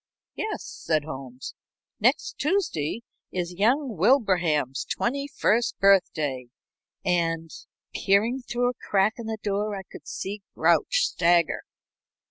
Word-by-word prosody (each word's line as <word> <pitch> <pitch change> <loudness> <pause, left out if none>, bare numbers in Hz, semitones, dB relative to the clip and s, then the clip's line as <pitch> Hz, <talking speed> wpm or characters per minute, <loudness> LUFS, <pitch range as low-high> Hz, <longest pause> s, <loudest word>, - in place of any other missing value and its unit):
"Yes," 430 -1 -4
said 155 -2 -1
Holmes. 130 -4 -7 0.5
"Next - - +1
Tuesday 280 - 0 0.3
is 180 -1 -3
young 240 - +1
Wilbraham's 175 - +2
twenty 275 +4 -2
first 235 -4 +1
birthday, 155 -10 +2 0.6
and 165 -3 0 0.2
" - - -60
Peering 220 +7 +2
through 245 0 0
a 250 - -15
crack 200 +2 +3
in 230 - -6
the 220 0 -3
door 205 +1 -1
I 195 - -6
could - - -13
see 200 +2 -5
Grouch - - +3
stagger. 170 -1 +2
195 Hz, 120 wpm, -26 LUFS, 165-240 Hz, 0.6 s, crack